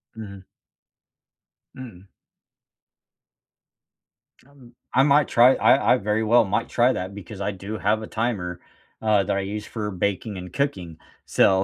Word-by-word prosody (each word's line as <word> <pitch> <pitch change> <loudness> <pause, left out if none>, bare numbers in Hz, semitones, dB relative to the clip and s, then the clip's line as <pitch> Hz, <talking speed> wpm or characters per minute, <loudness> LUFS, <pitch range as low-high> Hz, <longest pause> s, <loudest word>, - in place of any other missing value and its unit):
Mhm. 100 -4 -10 1.3
Mm. 115 -8 -11 2.4
Um, 135 -3 -19 0.2
I 135 - +4
might 145 +1 +4
try 125 +2 +5
I 135 - +4
I - - +3
very 105 0 -1
well 115 +2 +4
might 100 +4 -2
try 125 +2 +3
that, 95 +2 -5
because 100 0 -9
I 100 - -1
do 100 +3 -7
have 105 +2 0
a 110 - -7
timer, 100 -7 -3 0.4
uh, 105 -2 +2
that 95 - -1
I - - 0
use 105 +2 -5
for 105 -2 -5
baking 100 +2 -3
and 90 -1 -9
cooking. 90 - -3 0.3
So, 95 0 +3
105 Hz, 145 wpm, -23 LUFS, 95-120 Hz, 2.4 s, try